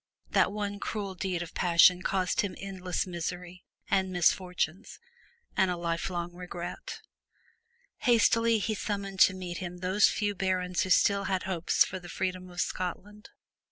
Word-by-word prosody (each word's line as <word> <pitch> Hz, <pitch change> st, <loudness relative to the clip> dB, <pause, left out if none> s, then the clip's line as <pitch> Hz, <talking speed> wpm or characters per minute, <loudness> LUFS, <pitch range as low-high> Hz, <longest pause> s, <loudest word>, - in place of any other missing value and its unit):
that -, -, +3 dB
one 205 Hz, -1 st, -3 dB
cruel 205 Hz, -3 st, -4 dB
deed 180 Hz, -1 st, -2 dB
of 170 Hz, -, -11 dB
passion 180 Hz, +1 st, +5 dB
caused 185 Hz, -1 st, +1 dB
him 195 Hz, -3 st, -4 dB
endless 185 Hz, -2 st, -3 dB
miseries 180 Hz, 0 st, -5 dB, 0.3 s
and 190 Hz, -1 st, +1 dB
misfortunes 180 Hz, +1 st, 0 dB, 0.6 s
and 190 Hz, -, +3 dB
a 180 Hz, -, -1 dB
lifelong 170 Hz, +1 st, -3 dB
regret. 180 Hz, -, -7 dB, 1.0 s
Hastily 230 Hz, -1 st, +4 dB
he 215 Hz, +1 st, -1 dB
summoned 200 Hz, -2 st, -4 dB
to 185 Hz, -, +6 dB
meet 180 Hz, -2 st, -5 dB
him 180 Hz, -2 st, -6 dB
those 185 Hz, +3 st, +3 dB
few 205 Hz, -1 st, -1 dB
barons 185 Hz, -2 st, -1 dB
who 185 Hz, -, -1 dB
still 200 Hz, +2 st, +4 dB
had 190 Hz, -1 st, -1 dB
hopes 180 Hz, -3 st, +2 dB
for 185 Hz, -, -6 dB
the 175 Hz, -1 st, -11 dB
freedom 185 Hz, +1 st, -3 dB
of 175 Hz, 0 st, -3 dB
Scotland. 205 Hz, +4 st, -5 dB
185 Hz, 150 wpm, -29 LUFS, 180-200 Hz, 1.0 s, to